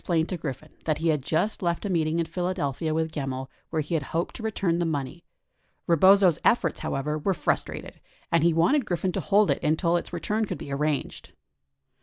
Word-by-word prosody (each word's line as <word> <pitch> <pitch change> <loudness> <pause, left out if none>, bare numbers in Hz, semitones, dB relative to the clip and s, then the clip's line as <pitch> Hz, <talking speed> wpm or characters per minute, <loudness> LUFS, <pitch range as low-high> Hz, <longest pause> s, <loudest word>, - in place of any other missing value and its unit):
1016 - - -25
plained 160 +1 +1
to 185 - -2
Griffin 150 +1 -6
that 155 -2 +1
he 165 +1 0
had 150 -3 +2
just 160 +11 -1
left 170 +2 -1
a - - 0
meeting 165 -3 +1
in 170 - +1
Philadelphia 165 -3 -2
with 160 0 0
Gemmill 135 -3 -4 0.2
where 160 -2 -1
he 150 - -6
had 160 - +2
hoped 165 +5 -3
to - - -7
return 195 -6 0
the - - +1
money. 155 0 -3 0.6
Rebozo's 185 0 +5
efforts, 195 -9 +2
however, 150 +3 -2
were 190 +5 0
frustrated, - - -2 0.3
and 165 -2 +3
he 170 - +5
wanted 175 - +3
Griffin 185 -2 -1
to - - -2
hold 205 0 +3
it - - -1
until 165 +3 +2
its - - -5
return 210 +6 -1
could - - -4
be 140 - -6
arranged. 150 0 -2
165 Hz, 205 wpm, -26 LUFS, 155-180 Hz, 0.6 s, Rebozo's